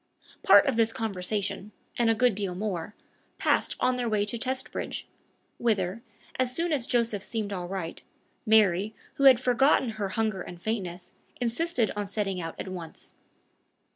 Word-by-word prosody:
Part 405 -8 +7
of 270 -5 0
this 225 -1 +3
conversation, 205 0 -2 0.2
and 235 -1 +2
a 225 - +4
good 245 +1 +3
deal 195 -2 -2
more, 195 -1 -4 0.4
passed - - +1
on 255 0 +2
their 245 -2 -1
way 210 -1 +1
to 220 +3 -4
Testbridge, 260 +2 -3 0.5
whither, 205 -2 0 0.4
as 255 0 +1
soon 335 0 0
as 260 -5 -1
Joseph 230 -5 +1
seemed 210 -2 -3
all 180 -2 -4
right, 180 -3 -5 0.4
Mary, 215 -2 +3 0.2
who 275 - +2
had 260 -3 +8
forgotten 255 +1 +3
her 215 -3 -3
hunger 215 -1 -1
and 175 -1 -8
faintness, 180 -4 -4 0.3
insisted 245 0 0
on 205 -1 -3
setting 195 -2 -2
out 165 -1 -6
at - - -5
once. 180 -3 -8
215 Hz, 160 wpm, -28 LUFS, 190-240 Hz, 0.5 s, had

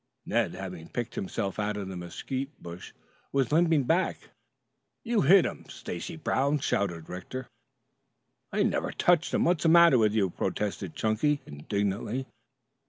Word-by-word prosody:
Ned, - - 0
having 90 -3 -7
picked 120 -2 -4
himself 100 +1 -3
out 105 0 -1
of 100 -2 -4
the 95 - -6
mesquite 130 - -5
bush, 85 +1 -9 0.4
was 135 -4 +1
limping 160 -2 +4
back. 170 +8 0 0.7
"You 230 -3 +1
hit 190 0 +6
him, - - -5
Stacy 90 - -6
Brown!" 145 -2 +1
shouted 90 - -1
Rector. 110 +9 -6 1.1
"I - - +2
never - - 0
touched 175 -2 +2
him. - - +2
What's 170 -3 +2
the 165 - +3
matter 170 -5 +7
with 105 -2 +3
you?" 100 -5 +2
protested 100 -3 -3
Chunky 125 +7 +1
indignantly. 100 - -2
115 Hz, 145 wpm, -28 LUFS, 95-150 Hz, 1.1 s, matter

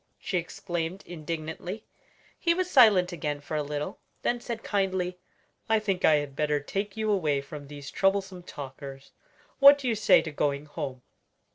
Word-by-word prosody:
she 185 - -1
exclaimed 175 +1 -4
indignantly. 165 +5 -5 0.5
He 335 -1 +2
was 370 0 0
silent 205 -9 +6
again 150 -3 -3
for 145 +2 -6
a 150 - +1
little; 150 0 -4 0.2
then 240 0 0
said 235 -2 -5
kindly, 185 -3 -1 0.5
"I 220 - +5
think 200 -4 -1
I 155 - +6
had 145 -2 -2
better 150 0 +1
take 195 +8 -4
you 215 -1 0
away 155 -8 +2
from 145 +1 -9
these 145 -1 -9
troublesome 195 -1 +1
talkers. 135 -3 -9 0.5
What 280 0 +10
do 275 -3 -4
you 235 - +2
say 215 -1 +5
to 160 - -5
going 145 0 -1
home?" 140 -4 -6
175 Hz, 165 wpm, -28 LUFS, 145-200 Hz, 0.5 s, What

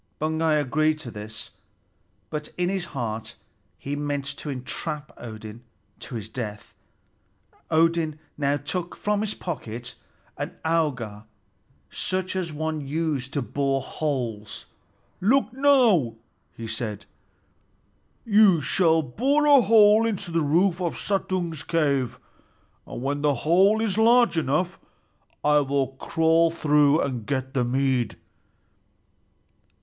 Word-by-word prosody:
Baugi 160 0 +1
agreed 155 +2 +1
to 150 -6 -8
this; 110 +1 -8 0.8
but 150 -1 -4
in 180 0 +1
his 190 -2 -2
heart 115 -7 -5 0.4
he 140 +1 -4
meant 145 -1 -2
to 150 - -6
entrap 145 +3 -5
Odin 110 -1 -9 0.4
to 125 - -7
his 110 -3 -5
death. 110 -3 -6 1.0
Odin 165 -1 +2 0.2
now 145 0 +1
took 170 +5 -4
from 210 0 -1
his 215 -1 -2
pocket 120 -9 -6 0.5
an - - -4
auger 125 -11 -1 0.7
such 185 0 -2
as 180 -3 -2
one 155 0 -3
uses 145 -2 -2
to 140 -1 -2
bore 135 +3 0
holes. 120 -9 -3 0.5
"Look, 250 +6 +2
now," 245 - +4 0.4
he 115 - -6
said. 110 -2 -5 1.2
"You 205 -5 +5
shall 160 +2 +2
bore 270 - +1
a 285 -3 +7
hole 215 +1 +6
into 200 -5 -2
the 165 0 +1
roof 170 +5 +2
of 170 -2 -2
Suttung's 185 -5 -2
cave, 140 -7 0 0.7
and 120 - -7
when 145 +1 -1
the 145 -1 +2
hole 190 +7 +5
is 220 -2 0
large 235 -1 +5
enough, 170 +4 0 0.6
I 150 0 +5
will 140 -2 0
crawl 165 +4 +2
through 150 -2 +3
and 125 -5 -2
get 130 -1 -2
the 130 -3 +1
mead." 130 -2 0
150 Hz, 125 wpm, -25 LUFS, 130-180 Hz, 1.2 s, a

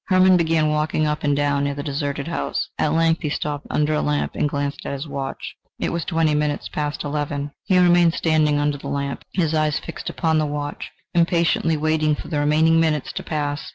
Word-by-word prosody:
Hermann 185 -1 +5
began 165 -2 +2
walking 155 0 0
up 150 +1 -2
and 145 -1 +2
down 145 0 +1
near 140 0 -1
the 145 - -5
deserted 140 0 -3
house; 170 - -2
at 150 - +2
length 165 0 +2
he 155 - -1
stopped 145 0 -3
under 150 +1 +1
a 150 - +1
lamp, 150 0 0
and 145 - 0
glanced 145 0 -3
at - - -4
his 140 +3 -5
watch: 135 -2 -5 0.2
it - - -2
was 170 -2 -2
twenty 160 -3 +1
minutes 150 0 -1
past 150 -1 -3
eleven. 145 -1 -3
He 190 -3 +3
remained 175 -2 +5
standing 155 -2 +2
under 145 -1 0
the - - -8
lamp, 140 0 -3
his 165 -4 +1
eyes 155 -2 +1
fixed - - -6
upon 160 -2 +1
the 155 - 0
watch, 145 0 -4 0.2
impatiently 170 -1 +2
waiting 155 0 +1
for - - -9
the 150 - -1
remaining 155 +2 +3
minutes 155 -3 0
to - - -4
pass. 145 -2 -2
150 Hz, 210 wpm, -22 LUFS, 145-160 Hz, 0.2 s, Hermann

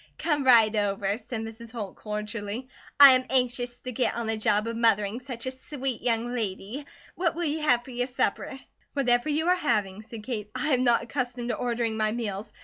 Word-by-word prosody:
"Come 295 -4 0
right 225 -4 +6
over," 200 0 0
said 245 -3 -5
Mrs. 225 +1 -8
Holt, 215 -5 -6
cordially. 210 +2 -5 0.3
"I 280 -1 +12
am 255 0 +3
anxious 245 -1 0
to 255 - -7
git 250 -1 0
on 235 0 -3
the 220 0 0
job 210 0 +1
of 230 0 -3
mothering 225 -1 +2
such 250 -2 -6
a 260 - -1
sweet 260 -1 -5
young 235 0 0
lady. 225 +4 -4 0.3
What 340 -2 0
will 345 - -2
you 310 +1 -1
have 245 -6 +3
for 260 - -11
your 245 0 -1
supper?" 265 +1 -2 0.3
"Whatever 245 0 +2
you 310 +3 0
are 360 - +5
having," 215 - -1
said 220 0 -10
Kate. 210 -4 -4
"I 305 - -1
am 255 0 +2
not 240 -2 +3
accustomed 245 -1 -3
to - - 0
ordering 235 -2 -1
my 215 -1 +1
meals. 210 -2 -4
240 Hz, 205 wpm, -27 LUFS, 215-260 Hz, 0.3 s, I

